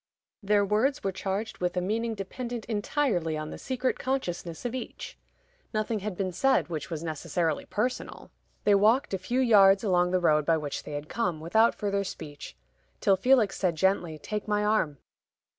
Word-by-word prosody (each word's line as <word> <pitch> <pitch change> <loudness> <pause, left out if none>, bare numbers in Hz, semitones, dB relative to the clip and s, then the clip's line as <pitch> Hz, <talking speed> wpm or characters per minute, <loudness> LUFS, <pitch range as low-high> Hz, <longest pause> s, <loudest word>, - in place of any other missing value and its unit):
Their 205 0 +3
words 220 +8 +1
were 195 - 0
charged 195 +3 -4
with 180 0 -1
a - - +4
meaning 220 +5 -1
dependent 235 +4 -5
entirely 205 - 0
on 155 0 -5
the - - -8
secret 260 -1 -2
consciousness 175 -9 -3
of 245 - -2
each. 255 - -6 0.6
Nothing 215 0 0
had 200 -2 -5
been 190 -2 -1
said 265 +2 +2
which 155 -1 -4
was 165 -2 -4
necessarily 160 0 -2
personal. 245 +5 -3 0.3
They 205 - +4
walked 215 +5 +3
a 190 - 0
few 240 +7 -1
yards 200 -5 +6
along 180 -3 +2
the 185 0 +2
road 150 -3 +3
by 165 +2 +2
which 150 -2 -4
they 150 - -7
had 145 +1 -5
come, 180 -5 -1
without 220 +9 +3
further 200 -2 -1
speech, 145 - -8 0.4
till 195 - +4
Felix 235 +1 +3
said 180 -4 +1
gently, 175 -2 +1
"Take 210 +8 -5
my 210 0 +1
arm." 210 -9 +1
195 Hz, 175 wpm, -28 LUFS, 170-220 Hz, 0.6 s, yards